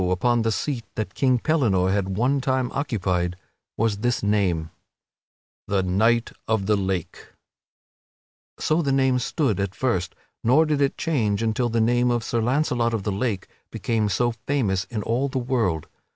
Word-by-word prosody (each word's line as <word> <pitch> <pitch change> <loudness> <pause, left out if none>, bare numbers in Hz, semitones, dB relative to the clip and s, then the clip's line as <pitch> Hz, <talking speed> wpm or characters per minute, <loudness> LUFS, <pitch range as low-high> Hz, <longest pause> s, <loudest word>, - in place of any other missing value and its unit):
upon 120 +6 +2
the 115 0 +1
seat 125 +1 -2
that 105 -5 -3
King 130 -2 +2
Pellinore 115 - +2
had 95 -1 -1
one 135 +5 +2
time 130 -2 0
occupied 95 - -1 0.4
was 110 -2 +1
this 120 +1 0
name: 95 -6 +1 1.0
THE 100 -2 +1
KNIGHT 110 +6 +2 0.2
OF 110 -3 +1
THE 105 +1 +3
LAKE 95 -4 -3 1.3
So 155 +2 +1
the 140 -4 0
name 130 -1 +3
stood 125 - 0
at 100 -1 -2
first, 95 -10 -1 0.3
nor 135 +8 +5
did 150 -2 0
it 140 - +1
change 115 -10 0
until 115 +2 0
the 115 0 0
name 120 +2 +3
of 120 -1 0
Sir 115 - -1
Launcelot 120 -2 +1
of 105 - -3
the 105 - -1
Lake 100 -1 -2 0.2
became 110 -2 -1
so 120 +5 +1 0.2
famous 105 -10 +1
in 110 -3 -4
all 125 +6 0
the 135 - -3
world. 120 - 0
115 Hz, 165 wpm, -24 LUFS, 100-130 Hz, 1.3 s, nor